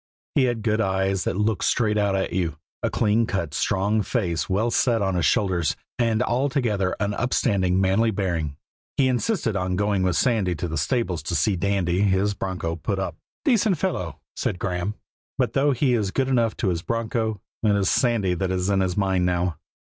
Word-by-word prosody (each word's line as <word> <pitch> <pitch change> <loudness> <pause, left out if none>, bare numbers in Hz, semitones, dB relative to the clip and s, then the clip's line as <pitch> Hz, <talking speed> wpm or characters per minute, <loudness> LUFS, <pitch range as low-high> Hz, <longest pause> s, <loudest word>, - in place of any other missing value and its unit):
He 135 - +4
had 120 -3 -1
good 110 0 +1
eyes 95 -2 0
that - - -1
looked 105 -1 0
straight 110 -3 +2
out 100 -1 +1
at 95 - -1
you, 85 -4 -1 0.2
a - - 0
clean 110 +1 +2
cut, 85 -7 -2
strong 100 +7 +1
face 90 - -1
well 110 +5 +1
set 120 -2 +2
on 95 -2 0
his 85 -5 +2
shoulders, 90 -6 +1 0.2
and 115 -1 +2
altogether 120 -7 0
an 100 0 0
upstanding, 100 -6 +1
manly 95 +4 +3
bearing. 85 -8 -2 0.4
He 135 - +4
insisted 130 - 0
on 90 -1 -1
going 100 0 +1
with 90 -2 +1
Sandy 105 -5 +1
to 85 +3 -3
the 80 - -4
stables 90 - 0
to 80 +3 -3
see 95 +7 +2
Dandy, 95 -1 0
his 100 0 +2
broncho, 90 -4 -3
put 100 +5 -2
up. 95 - -3 0.3
"Decent 220 - +3
fellow," 90 - -2 0.2
said - - -2
Graeme; 90 +2 -2 0.4
"but 125 -4 0
though 140 +2 +3
he 130 0 +2
is 105 -5 +1
good 135 +6 0
enough 115 -4 +1
to 105 - 0
his 85 -2 -1
broncho, 110 0 -2 0.2
it 105 -2 +3
is 100 -2 +1
Sandy 110 -8 +2
that's 95 +1 -1
in 100 -1 +2
his 95 -1 0
mind 95 -3 +2
now." 90 -3 0
100 Hz, 190 wpm, -24 LUFS, 90-115 Hz, 0.4 s, He